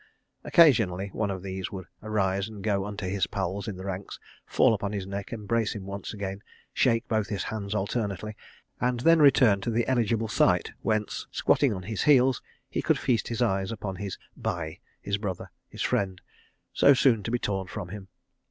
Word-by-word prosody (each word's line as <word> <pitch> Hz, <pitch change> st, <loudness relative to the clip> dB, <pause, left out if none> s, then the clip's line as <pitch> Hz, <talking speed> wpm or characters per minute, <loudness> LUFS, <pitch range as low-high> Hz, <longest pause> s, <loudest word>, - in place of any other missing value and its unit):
Occasionally 110 Hz, -, +4 dB
one 105 Hz, -2 st, -1 dB
of 95 Hz, -1 st, -4 dB
these 95 Hz, -1 st, -4 dB
would 95 Hz, -2 st, -6 dB, 0.2 s
arise 100 Hz, -2 st, 0 dB
and 105 Hz, -3 st, -9 dB
go 100 Hz, -2 st, +1 dB
unto 105 Hz, -1 st, -5 dB
his 95 Hz, +1 st, 0 dB
pal 95 Hz, +1 st, -3 dB
in 105 Hz, -, -4 dB
the 95 Hz, -, -8 dB
ranks, 95 Hz, 0 st, -5 dB, 0.3 s
fall -, -, +4 dB
upon 100 Hz, -1 st, -2 dB
his 100 Hz, -2 st, -3 dB
neck, 100 Hz, 0 st, -5 dB
embrace 110 Hz, 0 st, -1 dB
him 100 Hz, -2 st, -6 dB
once 100 Hz, 0 st, -5 dB
again, 100 Hz, -2 st, -5 dB, 0.3 s
shake 115 Hz, -1 st, +2 dB
both 110 Hz, -1 st, 0 dB
his 100 Hz, -2 st, -2 dB
hands 105 Hz, -1 st, -4 dB
alternately, 105 Hz, 0 st, -2 dB, 0.4 s
and 125 Hz, -1 st, 0 dB
then 165 Hz, +4 st, +6 dB
return 125 Hz, -8 st, +6 dB
to 120 Hz, -, -2 dB
the 115 Hz, +1 st, +1 dB
eligible 115 Hz, -3 st, +1 dB
site 100 Hz, -, +2 dB
whence, 110 Hz, -1 st, -1 dB
squatting 140 Hz, -4 st, +2 dB
on 95 Hz, -3 st, -4 dB
his 110 Hz, +1 st, -3 dB
heels, 130 Hz, -3 st, +4 dB, 0.3 s
he -, -, -2 dB
could -, -, +2 dB
feast 125 Hz, -4 st, 0 dB
his 120 Hz, +1 st, 0 dB
eyes 95 Hz, -2 st, 0 dB
upon 100 Hz, -4 st, -5 dB
his 100 Hz, 0 st, -5 dB, 0.2 s
bhai, 80 Hz, -3 st, -4 dB, 0.2 s
his 100 Hz, 0 st, -1 dB
brother, 95 Hz, -4 st, -5 dB, 0.2 s
his -, -, -5 dB
friend, 95 Hz, -2 st, 0 dB, 0.5 s
so 140 Hz, -, +6 dB
soon 125 Hz, -4 st, +4 dB
to 100 Hz, -, -4 dB
be 120 Hz, -, +1 dB
torn 95 Hz, -4 st, -2 dB
from 90 Hz, -, -6 dB
him. 100 Hz, 0 st, -8 dB
100 Hz, 190 wpm, -27 LUFS, 95-115 Hz, 0.5 s, then